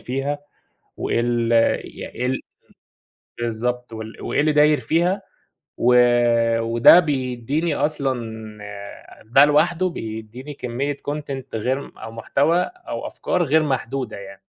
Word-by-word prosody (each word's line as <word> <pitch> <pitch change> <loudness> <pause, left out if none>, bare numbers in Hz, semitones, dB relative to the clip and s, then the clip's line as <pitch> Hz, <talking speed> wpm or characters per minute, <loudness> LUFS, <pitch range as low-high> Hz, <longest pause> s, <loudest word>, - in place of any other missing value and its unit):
فيها، 135 +3 -2 0.6
وإيه - - 0
ال 120 -1 0 0.3
ي - - -8
إيه 125 - -4
ال 125 - +1
امم 130 - -2 1.1
بالضبط، 120 +1 -3
وال 110 0 -8
وإيه - - 0
اللي 155 0 +3
داير 150 0 +4
فيها. 180 +5 +1 0.6
و 125 +1 +4 0.6
وده 115 +9 +7
بيديني 140 +1 -1
أصلًا 140 -4 0 0.5
آآ 100 -1 -10
ده 135 +6 +6
لوحده 170 +5 +2
بيديني 115 +2 -7
كميّة 135 +3 -3
content 140 -3 -4
غير 130 +5 -1
م - - -13
أو 115 - -8
محتوى 145 +9 +1
أو 360 - -6
أفكار 180 - -1
غير 155 +1 +3
محدودة 130 -5 -2
يعني. 100 0 -11
130 Hz, 130 wpm, -22 LUFS, 115-150 Hz, 1.1 s, وده